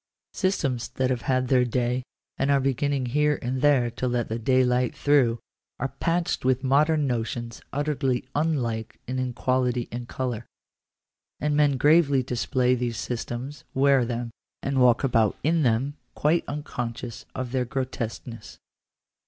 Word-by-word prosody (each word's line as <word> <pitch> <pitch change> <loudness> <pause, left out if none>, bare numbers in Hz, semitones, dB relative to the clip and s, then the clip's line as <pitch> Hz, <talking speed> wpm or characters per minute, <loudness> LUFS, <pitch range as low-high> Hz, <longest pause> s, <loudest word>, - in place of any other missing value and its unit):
Systems 140 - 0
that 130 0 +1
have 125 -2 -1
had 130 -1 +2
their 125 -1 +4
day, 125 +1 0 0.3
and 135 - 0
are 140 -1 +4
beginning 135 0 0
here 150 +4 +2
and 130 +1 -2
there 135 -5 +4
to 125 +2 -3
let 120 -1 -1
the 115 +1 -2
daylight 125 0 +2
through, 135 -5 +3 0.4
are 135 - -2
patched 170 +1 0
with 130 0 +2
modern 150 +3 +3
notions 120 -2 -3
utterly 140 -3 -1
unlike 125 -8 -1
in 130 0 -2
quality 125 -1 0
and 120 0 -5
colour; 120 -4 -4 0.9
and 150 0 0
men 145 -2 +3
gravely 145 -1 +4
display 125 +1 +1
these 120 -2 -1
systems, 125 +4 -5
wear 135 -1 +4
them, 120 0 -3 0.3
and 135 -1 +1
walk 125 0 +5
about 115 -5 +2
in 165 +2 +2
them, 130 +3 +1 0.2
quite 160 +3 +2
unconscious 125 -5 -5
of 130 -2 -4
their 130 -1 +1
grotesqueness. 120 -2 -5
130 Hz, 145 wpm, -26 LUFS, 120-140 Hz, 0.9 s, walk